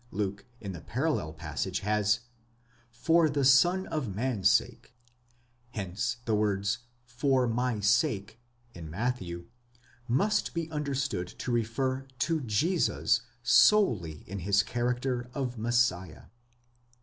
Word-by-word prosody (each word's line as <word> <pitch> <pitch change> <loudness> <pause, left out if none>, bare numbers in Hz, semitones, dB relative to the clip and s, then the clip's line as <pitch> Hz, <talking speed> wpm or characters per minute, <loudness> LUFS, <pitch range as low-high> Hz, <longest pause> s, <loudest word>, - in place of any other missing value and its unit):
Luke 100 -2 -3
in 100 -3 -6
the 85 -3 -8
parallel 130 - -1
passage 80 +4 -4
has, 105 +1 +1 0.7
for 160 +7 +3
the 140 -2 0
Son 175 +9 +5
of 130 -11 -3
man's 110 -5 +1
sake; 120 - 0 0.8
hence 100 +3 -3
the 115 - 0
words 100 -1 0 0.3
for 125 +1 +1
my 120 -1 -1
sake 110 -1 +1 0.3
in 80 -5 -9
Matthew, 90 -3 -3 0.6
must 200 - +1
be 165 -1 -2
understood 140 - -2
to 125 - -6
refer 130 +3 -1
to 160 +5 0
Jesus 140 - +1 0.2
solely 105 - +4
in 100 +2 -6
his 100 +3 +2
character 125 +1 -2
of 125 -4 -3
Messiah. 115 -6 0
120 Hz, 115 wpm, -29 LUFS, 100-135 Hz, 0.8 s, Son